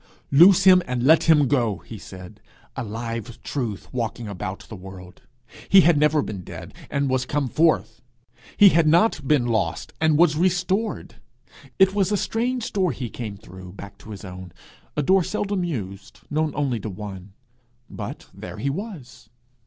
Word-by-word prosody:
'Loose 170 +7 +7
him 185 -1 +7
and 125 -1 -2
let 155 +5 +5
him 150 -4 +5
go,' 120 -7 +1
he 110 +1 -9
said 95 -2 -12 0.3
a - - -3
live 115 +1 -6
truth 115 -8 -4
walking 115 -1 -3
about 100 -1 -5
the 110 - -9
world: 90 -1 -12 0.5
he 195 - +8
had 170 -1 +4
never 150 0 +3
been 100 -3 -6
dead, - - -10 0.2
and 140 0 0
was 130 -1 0
come 140 +1 -1
forth; 160 +5 +1 0.6
he 205 - +9
had 165 -2 +3
not 165 -3 +3
been 145 -4 +3
lost, 110 -8 -2
and 155 -2 +3
was 165 -2 +4
restored! 185 +5 -1 0.6
It 190 0 +5
was 200 -1 +1
a 205 - +2
strange 240 +3 -2
door 185 -4 +1
he 120 -4 -6
came 110 -4 -6
through, 95 -2 -12
back 100 0 -11
to 110 - -14
his 100 -2 -8
own 90 -1 -9 0.5
a 150 - +1
door 190 +5 +4
seldom 200 0 -2
used, 100 - -6
known 155 +1 0
only 135 -5 -1
to 110 - -5
one 95 -1 -8 0.5
but - - -7
there - - -9
he 140 - -1
was! 165 - -8
135 Hz, 170 wpm, -23 LUFS, 105-170 Hz, 0.6 s, he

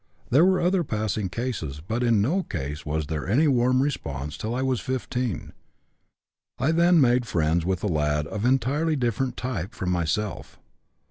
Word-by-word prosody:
There 140 +7 +6
were 185 0 +4
other 180 0 +2
passing 105 - -2
cases, 95 - -4
but 110 +10 -3
in 115 -4 +3
no 170 - +1
case 75 - -5
was 80 +1 -1
there 75 -1 -4
any 145 +10 +4
warm 130 -1 +3
response 75 - -3
till 110 +2 -4
I 130 - -1
was 130 -3 0
15. 125 -3 -3 1.0
I 135 +6 +1
then 170 +1 +4
made 125 -3 +3
friends 80 -1 +1
with 95 -2 -1
a - - +1
lad 75 -3 0
of 100 +7 -5
entirely 135 +6 +2
different 125 -1 -1
type 115 -8 -4
from 90 -2 -2
myself. 90 +3 -2
115 Hz, 170 wpm, -25 LUFS, 85-130 Hz, 1.0 s, There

